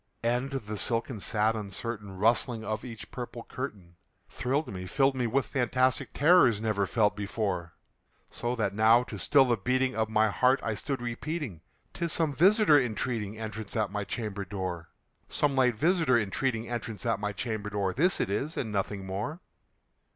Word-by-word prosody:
And 120 +3 +1
the 105 -7 -4
silken 115 -1 0
sad 110 +3 +1
uncertain 105 -1 -5
rustling 115 +2 +1
of 110 0 -3
each 115 -4 -9
purple 120 -1 -6
curtain 100 -10 -7 0.3
Thrilled 135 +5 -1
me 90 -1 -6
filled 135 +5 +2
me 125 -2 0
with 130 +2 +1
fantastic 130 +2 +1
terrors 145 - +5
never 105 -3 0
felt 105 -2 +2
before; 100 -4 -3 0.6
So 120 +1 -2
that 105 -4 -1
now, 110 +3 +5
to - - -8
still 140 -2 +5
the 120 -2 +1
beating 130 +5 0
of 110 -1 0
my 110 0 +3
heart, 130 +5 +3
I 110 - -1
stood 130 +3 -3
repeating 120 - -4 0.3
"'Tis 170 -1 -2
some 160 -3 +1
visitor 185 - +5
entreating 110 -2 -3
entrance 110 -1 -6
at 110 -4 0
my 105 0 -2
chamber 100 -1 -4
door 95 -3 -5 0.4
Some 145 -2 +1
late 125 -3 +3
visitor 160 - +3
entreating 115 +2 -1
entrance 115 -4 -4
at - - +1
my 105 0 -2
chamber 105 +1 -4
door; 100 -2 -1
This 180 +8 +2
it - - 0
is 140 +10 -2
and 110 - -2
nothing 100 -1 -2
more." 105 - -4
115 Hz, 170 wpm, -29 LUFS, 105-130 Hz, 0.6 s, terrors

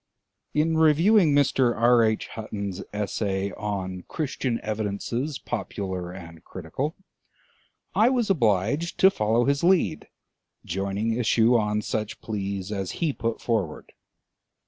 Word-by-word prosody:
In 160 +2 +2
reviewing 160 +3 +5
Mr. 130 -4 +3
R. 120 0 +5
H. 110 -1 0
Hutton's 100 -3 -5
Essay 100 -1 -2
on 95 -3 -4
"Christian 135 -5 -2
Evidences, 110 +6 -3
Popular 95 -5 -4
and 85 -3 -11
Critical," 110 - -4 1.0
I 225 +3 +4
was 245 -4 +1
obliged 120 - +1
to 190 - +6
follow 115 - +1
his 140 +2 +1
lead, 185 0 +2 0.6
joining 100 +5 -1
issue 115 0 +3
on 105 -1 +1
such 110 0 -3
pleas 100 -2 -4
as 95 -3 -3
he 160 -4 -1
put 115 -2 -3
forward. 100 -10 -2
110 Hz, 120 wpm, -25 LUFS, 100-140 Hz, 1.0 s, to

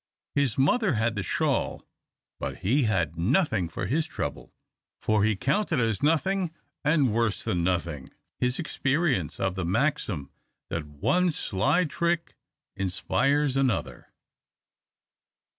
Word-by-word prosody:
His 140 -5 +1
mother 175 - +3
had 110 0 0
the 105 - -1
shawl, - - -1 0.5
but - - -4
he 130 +6 +3
had 85 -6 0
nothing 110 - +2
for 85 - -4
his 150 +10 0
trouble, - - -5 0.5
for 110 -1 +2
he 110 0 +2
counted 150 - 0
as 115 -3 0
nothing 175 +5 +2 0.3
and 145 -6 +3
worse 115 -2 +1
than 85 -1 0
nothing 85 -6 -1 0.3
his 125 +1 +1
experience 135 - 0
of 95 -1 0
the 95 -1 -3
maxim 95 - 0 0.4
that 80 -2 -3
one 180 - +1
sly 145 - +2
trick 170 +2 -1 0.4
inspires 125 - +1
another. 135 -3 -1
120 Hz, 125 wpm, -27 LUFS, 95-150 Hz, 0.5 s, mother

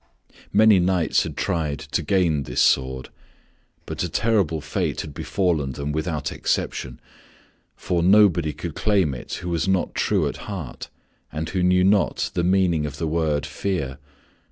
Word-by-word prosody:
Many 105 -1 +6
knights 90 -2 +2
had - - -5
tried 75 -4 -1
to 70 +4 -3
gain 85 -3 +1
this - - -4
sword, 65 -1 +2 0.8
but - - -5
a - - -1
terrible 100 -8 +1
fate - - -2
had 75 - -8
befallen 80 -9 -1
them 70 +2 -4
without 80 0 -2
exception, 60 -2 -2 0.8
for 90 -2 -1
nobody 90 -4 +4
could 75 +2 -6
claim 95 -8 +1
it 60 - -8
who 90 - -4
was 85 +1 -1
not 95 -2 0
true - - +1
at - - -5
heart, 90 -11 -7 0.4
and 80 +1 -4
who 90 +4 -1
knew 90 0 +3
not 100 +1 +2
the 85 - 0
meaning 90 -4 +2
of 70 0 -8
the 80 - -2
word 80 -2 0
fear. 70 -10 -3
85 Hz, 155 wpm, -23 LUFS, 75-95 Hz, 0.8 s, Many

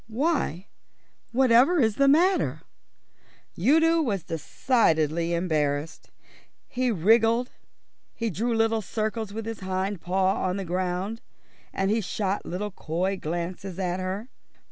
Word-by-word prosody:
"Why, 230 - -1 0.7
whatever 260 +6 +4
is 220 -5 +2
the 275 - +4
matter?" 350 +7 +3 0.9
Udo 320 - +3
was 205 - -1
decidedly 165 - +1
embarrassed. 155 -3 -1 0.6
He 255 0 -1
wriggled. 225 +5 +3 0.6
He 230 -2 -2
drew 230 +6 -1
little 225 0 +2
circles 215 +1 -3
with 220 +1 -5
his 225 -2 -5
hind 190 0 -3
paw 190 +1 +1
on 185 +1 -1
the 195 - -4
ground 185 +5 -2 0.5
and 195 +1 0
he 225 +1 +1
shot 195 +1 -2
little 205 +4 -3
coy 180 +2 -2
glances 175 +2 -5
at 180 -1 -2
her. 190 +6 -4
200 Hz, 120 wpm, -26 LUFS, 180-230 Hz, 0.9 s, whatever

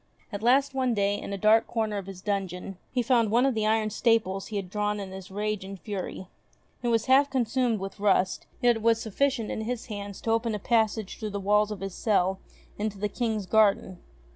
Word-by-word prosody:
At 205 -1 -5
last 270 +4 +3
one 255 -3 +1
day, 200 0 +1
in - - -6
a 200 - -2
dark 215 +3 +4
corner 215 -3 -1
of 195 - -9
his 190 -1 -9
dungeon, 195 -2 -3
he 250 -2 0
found 235 -2 +3
one 240 +4 +3
of 270 - +2
the 215 -1 0
iron 215 0 +1
staples 215 -4 +1
he 215 - -7
had 195 -2 -2
drawn 210 +2 -1
in 195 -2 -6
his 190 -1 -9
rage 210 0 -2
and 195 0 -8
fury. 190 -2 -5 0.6
It 245 - -2
was 230 -1 +2
half 275 +2 +5
consumed 250 -3 0
with 195 +1 -7
rust, 190 -2 +1 0.2
yet 240 -1 +5
it - - -8
was 230 0 +3
sufficient 230 +2 -1
in - - -3
his 235 +1 -3
hands 200 -1 -6
to 225 - -1
open 225 -1 +1
a - - -1
passage 220 -1 0
through 215 - -3
the 200 0 -4
walls 210 +1 +3
of 210 -3 -6
his 195 -1 -4
cell 190 -3 +1 0.4
into 210 -1 -2
the 205 +1 -2
King's 220 -3 -2
garden. 200 -3 +2
215 Hz, 220 wpm, -27 LUFS, 195-230 Hz, 0.6 s, half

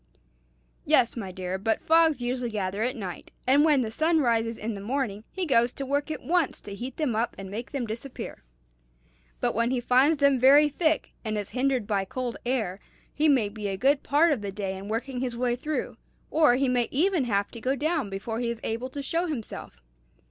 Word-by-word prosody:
"Yes, 235 - +3
my 200 -6 -5
dear; 185 0 -4
but 220 +3 0
fogs 320 -5 +3
usually 245 0 -1
gather 200 -2 -2
at 250 +4 0
night, 190 -7 -7
and 275 +3 +5
when 300 -4 +4
the 220 -3 -2
sun 320 +7 +2
rises 230 -4 +1
in 220 +1 -3
the 200 - -7
morning, 220 -2 -2
he 380 -1 -3
goes 240 -5 +3
to 275 - -5
work 285 +3 -1
at 310 - -5
once 340 -3 +1
to 200 - -8
heat 245 +5 -6
them 290 -8 0
up 230 +2 -1
and 195 -1 -8
make 230 +4 -5
them 275 -4 -3
disappear. 235 +4 -7 1.0
But - - +1
when 230 +2 +1
he 255 -1 0
finds 260 +6 +4
them 280 -2 +4
very 285 +4 +7
thick, 315 +2 0
and 215 -2 -2
is 205 -2 -4
hindered 260 -3 +1
by 200 -2 0
cold 245 +3 -4
air, 220 -7 -1 0.3
he 305 +1 +2
may 255 -7 +4
be 205 0 -5
a 195 -1 -2
good 275 +6 +3
part 310 +4 +3
of 265 -7 0
the 200 -1 -4
day 195 -1 -3
in 195 +1 -8
working 245 +4 -3
his 245 -2 -3
way 245 0 +1
through, 305 +4 -3 0.3
or 305 -6 +5
he 270 +1 +1
may 245 -2 +1
even 335 0 +2
have 200 -3 0
to 230 - -9
go 260 +3 +1
down 305 -4 -1
before 205 +4 -4
he 240 -1 -1
is 235 -1 -4
able 230 +3 -3
to 280 +1 -6
show 335 +5 -1
himself. 220 - -6
245 Hz, 215 wpm, -27 LUFS, 215-280 Hz, 1.0 s, very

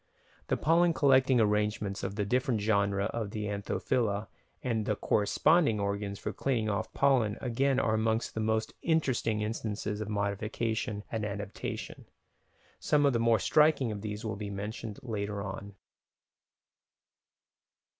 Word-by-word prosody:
The - - +1
pollen 170 +2 +3
collecting 130 -2 +4
arrangements 105 -2 +1
of 95 +1 -4
the 105 -1 -1
different 125 +1 +1
genera 100 -1 +1
of 110 -3 -2
the 105 0 -4
Anthophila 105 +1 -1 0.3
and 115 -4 -1
the 105 - +1
corresponding 115 - +3
organs 100 0 -2
for - - -4
cleaning 115 -5 0
off 100 -2 -2
the - - -15
pollen 125 -7 +3
again 130 +2 +1
are 110 - +1
amongst 110 +1 0
the - - -4
most 110 0 0
interesting 130 -9 +1
instances 105 -1 -3
of 105 - -4
modification 105 +1 -2
and 110 -2 -2
adaptation: 100 -1 -5 0.7
some 145 -1 +2
of 140 - +4
the 115 - +1
more 115 -1 +4
striking 150 -3 +3
of 105 -1 -5
these 105 +1 -5
will 110 -1 -3
be 105 0 -5
mentioned 105 +2 -5
later 105 -4 -3
on. 100 0 -7
110 Hz, 145 wpm, -30 LUFS, 100-120 Hz, 0.7 s, collecting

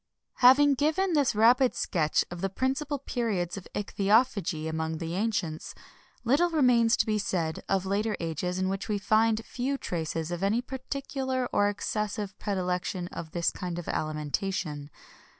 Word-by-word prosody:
[XXI - - -26
22] 245 - +9
Having 285 +2 +7
given 315 +7 +1
this 285 -7 +2
rapid 245 +4 +5
sketch 155 -6 +1
of 175 0 -6
the 195 - 0
principal 270 +7 -1
periods 225 -10 -2
of 195 - -8
ichthyophagy 200 -5 +1
among 160 0 -2
the 165 +1 -4
ancients, 185 -6 -2 0.5
little 285 +9 +3
remains 250 -7 +4
to - - +2
be 215 -2 0
said 170 -5 -2
of 195 -1 +1
later 205 +2 0
ages 170 +2 -2
in 185 0 0
which 195 +3 -3
we 210 - +1
find 220 +2 +2
few 265 +3 -2
traces 165 - -3
of 175 0 -3
any 200 +4 +2
particular 265 0 -3
or 205 0 +3
excessive 205 -1 -3
predilection 180 -2 -2
for - - -5
this 170 -1 0
kind 175 -2 -5
of 175 - -6
alimentation. 155 0 -2
205 Hz, 160 wpm, -28 LUFS, 175-250 Hz, 0.5 s, 22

